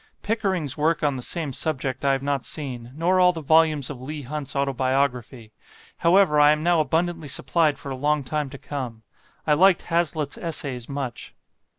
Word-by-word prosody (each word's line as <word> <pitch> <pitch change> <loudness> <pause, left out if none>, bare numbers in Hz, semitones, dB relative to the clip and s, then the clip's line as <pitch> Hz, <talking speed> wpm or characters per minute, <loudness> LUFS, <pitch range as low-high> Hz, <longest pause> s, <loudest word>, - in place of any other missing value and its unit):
Pickering's 190 - -1
work 155 +1 +1
on 145 -2 +2
the 130 - -5
same 155 +1 -3
subject 135 -2 -2
I 140 -1 +3
have 135 0 -2
not 140 -2 -1
seen; 125 -6 -5
nor 175 +4 +2
all 180 0 +6
the 165 - -5
volumes 155 -2 +3
of 130 -4 -9
Leigh 150 +2 -6
Hunt's 145 +1 -5
Autobiography. 130 -4 -1 0.4
However, 170 -3 +4
I 145 0 +7
am 150 0 +2
now 175 -1 +3
abundantly 165 +2 -1
supplied 150 +1 +1
for 140 -1 -7
a - - -3
long 145 +2 0
time 150 +2 -2
to 140 - -9
come. 125 -6 -6 0.4
I 150 - +3
liked 185 +3 +4
Hazlitt's 165 -4 -1
Essays 140 -7 -3
much. 135 -4 -5
145 Hz, 180 wpm, -24 LUFS, 135-160 Hz, 0.4 s, I